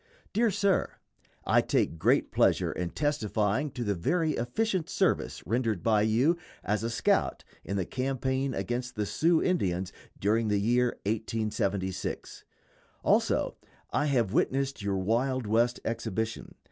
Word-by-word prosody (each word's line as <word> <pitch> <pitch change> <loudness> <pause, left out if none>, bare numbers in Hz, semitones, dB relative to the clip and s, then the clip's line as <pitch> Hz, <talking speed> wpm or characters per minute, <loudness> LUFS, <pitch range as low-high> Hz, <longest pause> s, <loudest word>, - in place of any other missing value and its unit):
_ - - -51
DEAR 230 +3 +3
SIR: 200 -1 +1 0.5
I - - +4
take 80 - 0
great - - +2
pleasure - - +3
in 90 -1 -3
testifying 115 - 0
to 125 - -3
the 105 -3 0
very 160 - +1
efficient 180 - -1
service - - 0
rendered 115 -3 0
by 110 -2 +3
you 120 +11 +3 0.3
"as 105 0 0
a 115 - -1
scout" 115 - +1 0.2
in 100 - -3
the 95 - 0
campaign 130 +2 -1
against 125 +1 -3
the 105 -1 -1
Sioux 160 - +2
Indians 95 - 0 0.2
during 110 +3 +1
the 105 -1 +2
year 120 +3 +2
1876. 105 -3 -2 0.6
Also - - +2
that - - -29 0.2
I 150 - +1
have 120 -8 +1
witnessed 135 -2 0
your 100 -1 -1
Wild 120 +6 0
West 115 +3 +2
exhibition. 110 -1 -3
115 Hz, 145 wpm, -29 LUFS, 105-135 Hz, 0.6 s, I